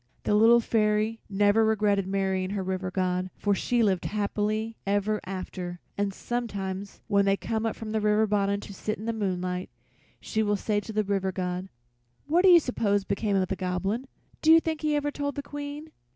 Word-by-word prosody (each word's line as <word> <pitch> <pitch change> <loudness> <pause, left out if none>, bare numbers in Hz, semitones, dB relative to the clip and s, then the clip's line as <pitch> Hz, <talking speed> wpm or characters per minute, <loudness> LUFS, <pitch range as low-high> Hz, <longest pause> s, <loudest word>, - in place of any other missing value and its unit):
The - - +1
Little 225 +3 +6
Fairy 215 0 +1
never 205 +2 +3
regretted 205 -3 +2
marrying 190 -1 0
her 200 -1 -2
River 185 0 -2
God, 185 0 -1
for 205 - +1
she 235 +4 +1
lived 190 -4 +1
happy 215 +2 -1
ever 205 +2 0
after, 185 -2 -5 0.2
and 200 0 0
sometimes 200 -4 -4
when 200 -2 +3
they 195 0 +3
come 225 +1 -2
up 225 - -2
from 220 -1 -6
the 220 0 0
river 210 +1 +3
bottom 200 -1 +1
to 200 - -9
sit 215 +3 -3
in 215 - -8
the 230 - -1
moonlight 185 -3 -2 0.5
she 220 - -1
will 205 -1 +2
say 205 +1 0
to 215 - -7
the 215 0 +1
River 195 -1 0
God: 180 0 -3 0.6
"What 325 +5 +3
do 385 - +7
you 350 -1 +9
suppose 205 -8 0
became 200 +1 -1
of 190 -1 +2
the 195 - -2
Goblin? 190 +7 -2 0.3
Do 320 - +5
you 325 - +9
think 320 -1 -3
he 305 -1 +1
ever 290 0 0
told 285 -1 -3
the 285 - -4
Queen?" 290 +2 -7
205 Hz, 195 wpm, -27 LUFS, 195-225 Hz, 0.6 s, you